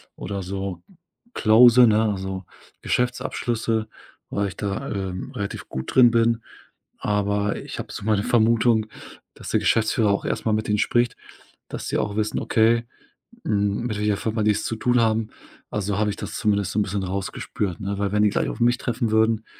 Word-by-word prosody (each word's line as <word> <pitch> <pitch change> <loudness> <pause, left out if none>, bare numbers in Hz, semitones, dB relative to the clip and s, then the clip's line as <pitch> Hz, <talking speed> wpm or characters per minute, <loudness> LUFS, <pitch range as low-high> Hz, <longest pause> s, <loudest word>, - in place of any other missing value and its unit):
oder 100 0 -5
so 95 -2 -5 0.5
close, 120 +2 +7
ne, 110 +1 +3
also 95 -1 -4 0.4
Geschäftsabschlüsse, 115 -2 -1 0.4
weil 100 -1 -1
ich - - -12
da, 105 +7 -3
ähm, 95 -2 -4
relativ 100 -1 -5
gut 65 0 -5
drin 120 -2 +7
bin. 115 -1 +2 0.5
Aber 105 0 0
ich - - -7
habe - - -6
so - - -7
meine 105 -1 +1
Vermutung, 115 -1 +3 0.5
dass - - -9
der - - +2
Geschäftsführer 110 -1 +2
auch 100 - -1
erstmal 110 - -1
mit 110 0 -1
den 105 0 +1
spricht, 120 +2 +1 0.5
dass - - -6
sie - - -1
auch 100 - -1
wissen, 110 0 -1
okay, 115 +1 +2 0.6
hm, 105 +2 0
mit 110 - -3
welcher 105 -1 0
Firma 110 -1 -2
die 105 - +4
es 105 - -2
zu 115 - -2
tun 125 +2 +2
haben. 110 -1 +1 0.4
A 105 - -1
so 100 0 -2
habe 105 0 +1
ich - - -6
das - - -6
zumindest 100 -3 0
so 105 - 0
'n 105 - +3
bisschen 100 -1 -3
rausgespürt, 95 0 -3
ne? 100 +1 -3
Weil 100 -1 -1
wenn 105 0 +2
die 105 - +5
gleich - - -1
auf - - -6
mich 120 +1 +3
treffen 120 -3 -2
würden, 110 0 +2
105 Hz, 185 wpm, -23 LUFS, 100-115 Hz, 0.6 s, close